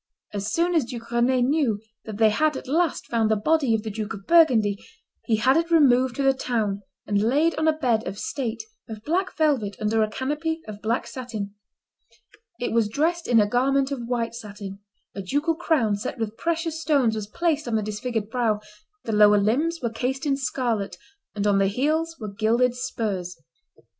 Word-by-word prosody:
As 205 Hz, +1 st, -3 dB
soon 345 Hz, +7 st, +1 dB
as 320 Hz, -7 st, +2 dB
Duke 230 Hz, -1 st, -8 dB
Rend 235 Hz, +1 st, +3 dB, 0.2 s
knew 270 Hz, -10 st, +1 dB, 0.3 s
that 215 Hz, -2 st, -6 dB
they 220 Hz, -1 st, +5 dB
had 305 Hz, +5 st, +1 dB
at -, -, -9 dB
last 325 Hz, +3 st, 0 dB
found 225 Hz, -2 st, +1 dB
the 220 Hz, -, +3 dB
body 270 Hz, +2 st, +2 dB
of 215 Hz, -, -3 dB
the 220 Hz, -, -4 dB
Duke 215 Hz, 0 st, -4 dB
of 195 Hz, -1 st, -12 dB
Burgundy, 235 Hz, -12 st, +4 dB, 0.4 s
he 225 Hz, -, +2 dB
had 245 Hz, +5 st, +3 dB
it 335 Hz, +1 st, 0 dB
removed 260 Hz, -6 st, +4 dB
to 280 Hz, -, -1 dB
the 270 Hz, 0 st, +4 dB
town, 220 Hz, -6 st, -1 dB, 0.2 s
and 200 Hz, -1 st, +1 dB
laid 290 Hz, +9 st, +2 dB
on 315 Hz, +1 st, 0 dB
a 310 Hz, -1 st, +2 dB
bed 235 Hz, -6 st, +1 dB
of 200 Hz, -, -5 dB
state 245 Hz, -, -3 dB, 0.3 s
of 215 Hz, -1 st, -8 dB
black 365 Hz, +7 st, -1 dB
velvet, 270 Hz, -11 st, +1 dB
under 220 Hz, +1 st, +1 dB
a 215 Hz, -, +1 dB
canopy 300 Hz, +7 st, -2 dB
of 210 Hz, -1 st, -8 dB
black 230 Hz, +3 st, 0 dB
satin. 220 Hz, -6 st, -6 dB, 1.1 s
It 245 Hz, -, -2 dB
was 225 Hz, -2 st, +2 dB
dressed 330 Hz, +8 st, 0 dB
in 235 Hz, -2 st, +5 dB
a 210 Hz, -, +5 dB
garment 270 Hz, +4 st, +1 dB
of 240 Hz, -4 st, -4 dB
white 235 Hz, -2 st, -1 dB
satin; 205 Hz, -3 st, -8 dB, 0.3 s
a 200 Hz, -, -5 dB
ducal 290 Hz, -, 0 dB
crown, 310 Hz, -10 st, +1 dB
set 205 Hz, +5 st, -5 dB
with 225 Hz, -2 st, -3 dB
precious 330 Hz, +1 st, -2 dB
stones, 280 Hz, -8 st, +2 dB
was 215 Hz, -2 st, -4 dB
placed 310 Hz, +3 st, -1 dB
on 230 Hz, -, 0 dB
the 215 Hz, -, +1 dB
disfigured 215 Hz, +1 st, -3 dB
brow; 225 Hz, -4 st, +1 dB, 0.4 s
the 225 Hz, -, -3 dB
lower 210 Hz, -1 st, +6 dB
limbs 285 Hz, +12 st, +1 dB
were 235 Hz, -, 0 dB
cased 260 Hz, +5 st, -2 dB
in 280 Hz, -2 st, +2 dB
scarlet, 235 Hz, -8 st, -2 dB, 0.4 s
and 205 Hz, -1 st, -1 dB
on 200 Hz, -1 st, +3 dB
the 195 Hz, -, +3 dB
heels 310 Hz, +9 st, 0 dB
were 210 Hz, -3 st, -6 dB
gilded 230 Hz, +4 st, +2 dB
spurs. 210 Hz, -8 st, -3 dB
235 Hz, 195 wpm, -24 LUFS, 215-290 Hz, 1.1 s, lower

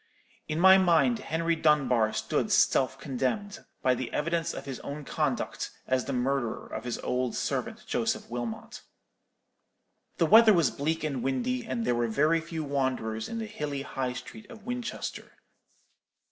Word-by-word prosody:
In 155 Hz, +1 st, -2 dB
my 190 Hz, +2 st, +8 dB
mind 190 Hz, +6 st, +3 dB
Henry 165 Hz, -2 st, 0 dB
Dunbar 135 Hz, -8 st, +3 dB
stood -, -, -1 dB
self 130 Hz, 0 st, +3 dB
condemned, 150 Hz, -, -3 dB, 0.2 s
by 130 Hz, -, +4 dB
the 125 Hz, 0 st, -4 dB
evidence 170 Hz, +2 st, 0 dB
of -, -, -7 dB
his 135 Hz, -2 st, -5 dB
own 145 Hz, +1 st, -7 dB
conduct, -, -, -2 dB, 0.2 s
as 130 Hz, -1 st, 0 dB
the -, -, -3 dB
murderer 130 Hz, -2 st, -1 dB
of 110 Hz, -, -7 dB
his 120 Hz, -, -2 dB
old 125 Hz, -1 st, -1 dB
servant -, -, -2 dB
Joseph -, -, -1 dB
Wilmot. 120 Hz, -1 st, -5 dB, 1.4 s
"The 165 Hz, -, +3 dB
weather 220 Hz, +5 st, +8 dB
was 165 Hz, -8 st, +3 dB
bleak 160 Hz, +3 st, -2 dB
and 140 Hz, -5 st, -2 dB
windy, 240 Hz, -, -1 dB
and 230 Hz, 0 st, -2 dB
there -, -, +2 dB
were 120 Hz, 0 st, +1 dB
very 155 Hz, +8 st, +2 dB
few 165 Hz, -1 st, -5 dB
wanderers 130 Hz, -6 st, -2 dB
in 230 Hz, -, -4 dB
the 225 Hz, -, -3 dB
hilly 150 Hz, -9 st, -4 dB
High 130 Hz, -2 st, -3 dB
Street 205 Hz, -, -10 dB
of 220 Hz, -3 st, -12 dB
Winchester. 245 Hz, -1 st, -5 dB
150 Hz, 160 wpm, -28 LUFS, 130-175 Hz, 1.4 s, my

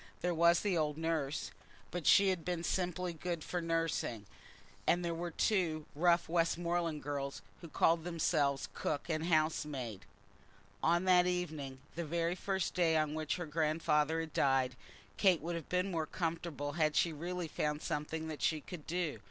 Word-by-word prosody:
There 175 Hz, 0 st, +1 dB
was 170 Hz, +1 st, +5 dB
the 200 Hz, -3 st, +1 dB
old 150 Hz, -2 st, 0 dB
nurse, 160 Hz, -3 st, -1 dB, 0.4 s
but 175 Hz, -3 st, -3 dB
she 200 Hz, -1 st, +7 dB
had 180 Hz, -3 st, -1 dB
been 175 Hz, -1 st, -2 dB
simply 180 Hz, -1 st, -1 dB
good 170 Hz, 0 st, -4 dB
for 175 Hz, -, -2 dB
nursing, 165 Hz, -10 st, -1 dB, 0.6 s
and 175 Hz, 0 st, +3 dB
there 170 Hz, -, -1 dB
were 170 Hz, +1 st, -3 dB
two 165 Hz, -4 st, +1 dB
rough 170 Hz, +3 st, +3 dB
Westmoreland 170 Hz, -1 st, 0 dB
girls 140 Hz, -1 st, -4 dB, 0.2 s
who 170 Hz, -, -8 dB
called 165 Hz, +1 st, +3 dB
themselves 155 Hz, -5 st, +1 dB
cook 145 Hz, +3 st, -3 dB
and 160 Hz, 0 st, -1 dB
housemaid. 150 Hz, -, 0 dB, 0.7 s
On 170 Hz, +2 st, +3 dB
that 180 Hz, -1 st, +5 dB
first 180 Hz, 0 st, +2 dB
evening, 145 Hz, -7 st, -5 dB
the 170 Hz, -, -3 dB
very 170 Hz, +2 st, 0 dB, 0.4 s
day 165 Hz, -2 st, +3 dB
on 155 Hz, -1 st, +1 dB
which 155 Hz, -1 st, -1 dB
her 175 Hz, -, -4 dB
grandfather 155 Hz, 0 st, +1 dB
had 160 Hz, -2 st, -7 dB
died, 135 Hz, -2 st, +2 dB, 0.4 s
Kate 185 Hz, -4 st, +4 dB
would 170 Hz, +3 st, -4 dB
have 165 Hz, -3 st, -5 dB
been 180 Hz, +2 st, 0 dB
more 160 Hz, -3 st, -1 dB
comfortable 165 Hz, -4 st, -3 dB
had 155 Hz, -1 st, +1 dB
she 170 Hz, -2 st, +3 dB
really 175 Hz, +3 st, -4 dB
found 150 Hz, 0 st, -2 dB
something 160 Hz, +1 st, -3 dB
that 155 Hz, -2 st, -6 dB
she 155 Hz, -, +2 dB
could 155 Hz, +1 st, -9 dB
do. 165 Hz, -8 st, -2 dB
165 Hz, 170 wpm, -34 LUFS, 150-175 Hz, 0.7 s, she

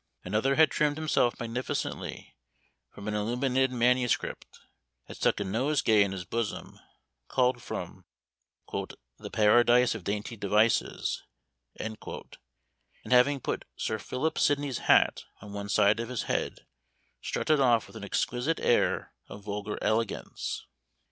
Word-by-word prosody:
Another 135 Hz, +6 st, +1 dB
had 160 Hz, +1 st, +5 dB
trimmed 150 Hz, -1 st, +1 dB
himself 155 Hz, -6 st, +1 dB
magnificently 120 Hz, +2 st, -4 dB, 0.5 s
from 100 Hz, -, -10 dB
an 105 Hz, -, -1 dB
illuminated 125 Hz, +5 st, +1 dB
manuscript, 125 Hz, 0 st, 0 dB, 0.4 s
had -, -, -11 dB
stuck -, -, +1 dB
a -, -, 0 dB
nosegay 110 Hz, +1 st, +2 dB
in 100 Hz, -1 st, +2 dB
his 95 Hz, -2 st, -5 dB
bosom, 115 Hz, 0 st, -4 dB, 0.5 s
culled 125 Hz, -1 st, +2 dB
from -, -, -6 dB, 0.7 s
"The -, -, -7 dB
Paradise 120 Hz, +3 st, +5 dB
of 115 Hz, -5 st, -7 dB
Dainty 105 Hz, +4 st, -3 dB
Devices," 105 Hz, +2 st, +1 dB, 0.5 s
and 110 Hz, 0 st, -5 dB, 1.2 s
having 125 Hz, +2 st, +5 dB
put -, -, -3 dB
Sir 110 Hz, -, -2 dB
Philip 140 Hz, +9 st, -2 dB
Sidney's 145 Hz, -3 st, +1 dB
hat -, -, +3 dB
on 105 Hz, -1 st, -10 dB
one 100 Hz, 0 st, -5 dB
side 105 Hz, +1 st, +4 dB
of 115 Hz, -, -4 dB
his 125 Hz, -3 st, -2 dB
head, -, -, -2 dB, 0.6 s
strutted 155 Hz, -2 st, +1 dB
off 120 Hz, -4 st, +4 dB
with -, -, -16 dB
an -, -, -8 dB
exquisite 125 Hz, +7 st, -1 dB
air 120 Hz, -, +1 dB, 0.2 s
of 100 Hz, -, -10 dB
vulgar 105 Hz, 0 st, -4 dB
elegance. 110 Hz, -1 st, -2 dB
115 Hz, 130 wpm, -29 LUFS, 105-130 Hz, 1.2 s, had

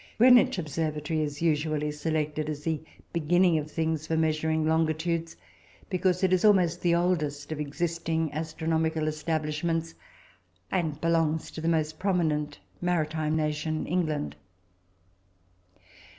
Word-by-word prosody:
Greenwich 250 Hz, +1 st, +6 dB
observatory 155 Hz, -1 st, -2 dB
is 145 Hz, +1 st, -3 dB
usually 150 Hz, -2 st, +1 dB
selected 155 Hz, 0 st, -2 dB
as 150 Hz, -1 st, -5 dB
the 160 Hz, -2 st, -1 dB, 0.3 s
beginning 170 Hz, +1 st, +3 dB
of 150 Hz, 0 st, -6 dB
things 160 Hz, -1 st, -2 dB
for 160 Hz, -, 0 dB
measuring 160 Hz, 0 st, +1 dB
longitudes, 160 Hz, +1 st, 0 dB, 0.5 s
because 185 Hz, 0 st, +1 dB
it 185 Hz, -1 st, +3 dB
is 185 Hz, -, +2 dB
almost 180 Hz, -5 st, +4 dB
the 170 Hz, -1 st, +3 dB
oldest 155 Hz, -5 st, 0 dB
of 155 Hz, -, -3 dB
existing 160 Hz, +1 st, -2 dB
astronomical 160 Hz, 0 st, -1 dB
establishments, 160 Hz, +1 st, -1 dB, 0.8 s
and 160 Hz, -5 st, -1 dB
belongs 165 Hz, -1 st, +1 dB
to 160 Hz, -, -7 dB
the 165 Hz, -, -2 dB
most 155 Hz, -1 st, 0 dB
prominent 160 Hz, -6 st, 0 dB, 0.2 s
maritime 155 Hz, -3 st, 0 dB
nation, 155 Hz, 0 st, -1 dB
England. 155 Hz, -, -1 dB
160 Hz, 120 wpm, -28 LUFS, 155-170 Hz, 0.8 s, Greenwich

